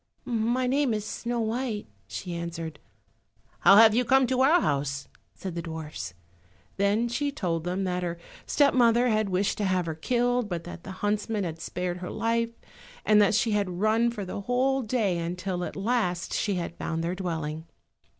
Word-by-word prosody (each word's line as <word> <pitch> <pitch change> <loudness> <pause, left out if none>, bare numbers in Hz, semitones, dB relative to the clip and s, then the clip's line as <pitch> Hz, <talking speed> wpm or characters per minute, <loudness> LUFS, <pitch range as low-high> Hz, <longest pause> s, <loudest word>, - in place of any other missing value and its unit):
"My 240 +2 0
name 265 -2 +2
is 210 -1 -3
Snow 235 +2 -3
white," 225 -1 -2 0.2
she 175 - -5
answered. 165 -2 -5 0.8
"How 195 - +7
have 220 0 +8
you 245 +3 +3
come 265 +2 +4
to 255 +1 +1
our 310 +7 +6
house?" 140 - -1 0.3
said 190 -3 -6
the 170 - -3
dwarfs. 160 - -6 0.6
Then 205 +4 +2
she 285 +5 -1
told 175 - -2
them 185 +2 -1
that 180 -1 -1
her 170 -1 -3 0.3
step 285 -1 +4
mother 240 0 +4
had 215 -2 +1
wished 190 +3 0
to - - 0
have 185 -2 +1
her 160 - -2
killed, 245 +6 0
but 170 -2 -3
that 175 0 -9
the 190 - -7
huntsman 210 0 0
had 165 -2 -5
spared 180 0 -3
her 180 0 -6
life, 230 +1 0 0.6
and 210 -1 +6
that 205 0 +4
she 230 0 +2
had 200 -4 -1
run 220 +3 +3
for 210 -4 -5
the 185 - -5
whole 260 +5 +1
day, 215 -7 0
until 180 +2 -3
at - - -5
last 195 -4 -1
she 205 -3 0
had 170 -1 -4
found 165 0 -2
their 170 +2 -1
dwelling. 160 -4 -4
200 Hz, 185 wpm, -27 LUFS, 175-235 Hz, 0.8 s, have